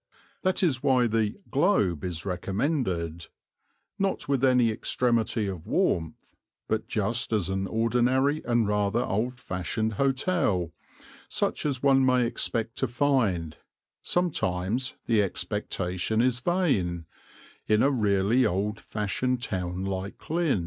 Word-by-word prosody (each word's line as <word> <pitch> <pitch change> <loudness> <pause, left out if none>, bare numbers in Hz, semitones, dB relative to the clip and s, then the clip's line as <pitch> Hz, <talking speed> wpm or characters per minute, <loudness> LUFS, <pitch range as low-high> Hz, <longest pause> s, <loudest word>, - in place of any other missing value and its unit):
That 185 0 +1
is 135 -8 +2
why 130 -3 +3
the 110 -2 0 0.2
"Globe" 135 - +2
is 85 -2 -4
recommended, 90 - -2 0.7
not 195 -1 -1
with 135 -2 0
any 125 -3 +4
extremity 115 -1 0
of 95 -2 -5
warmth, 90 - +1 0.5
but 110 0 -1
just 115 +3 0
as 100 -5 0
an 95 0 -1
ordinary 125 +7 +1
and 120 -3 +2
rather 105 +2 +1
old 120 +5 -2
fashioned 110 +2 -2
hotel, 130 - +1 0.6
such - - 0
as 135 -3 -3
one 135 -1 +5
may 125 -1 +3
expect 115 -1 -1
to 130 - 0
find 115 - 0 0.4
sometimes 125 - 0
the 110 -3 +3
expectation 95 +1 -2
is 120 0 +2
vain 120 - 0 0.6
in 105 0 +3
a 140 - +4
really 105 0 +2
old 105 +1 0
fashioned 120 +4 -2
town 90 -1 -3
like 95 +1 -5
Lynn. 165 - +2
115 Hz, 125 wpm, -27 LUFS, 95-130 Hz, 0.7 s, one